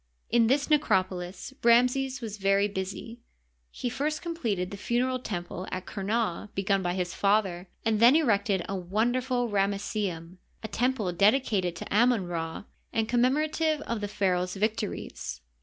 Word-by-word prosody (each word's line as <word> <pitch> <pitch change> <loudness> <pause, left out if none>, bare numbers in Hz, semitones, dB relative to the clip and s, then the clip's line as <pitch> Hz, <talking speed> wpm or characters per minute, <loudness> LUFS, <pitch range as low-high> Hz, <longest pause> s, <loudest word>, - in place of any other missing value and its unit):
In 230 -1 +4
this 280 +4 +2
necropolis 185 - 0
Ramses 250 +2 +3
was 215 -2 -6
very 195 +1 +3
busy. 200 +4 -5 0.5
He 245 - -5
first 290 +5 -2
completed 230 - -2
the - - -5
funereal 250 +4 0
temple 180 -5 -5
at 185 0 -4
Qumah 210 -1 -2
begun 195 0 +1
by 175 -1 -1
his 180 -2 -2
father, 195 -3 +1 0.2
and 220 -1 +2
then 240 +5 +7
erected 205 - +2
the - - -3
wonderful 240 +7 0
Ramesseum 195 -4 -2
— - - -38
a - - -3
temple 230 -5 0
dedi 210 +9 +4
cated 180 -5 0
to 185 - -5
Amon 235 -3 +4
Ra, 165 -1 -4 0.3
and 225 -1 0
commemorative 300 +6 +1
of 230 -5 -3
the 205 - -2
pharaoh's 185 -2 0
victories. 200 - -3
210 Hz, 150 wpm, -28 LUFS, 185-245 Hz, 0.5 s, then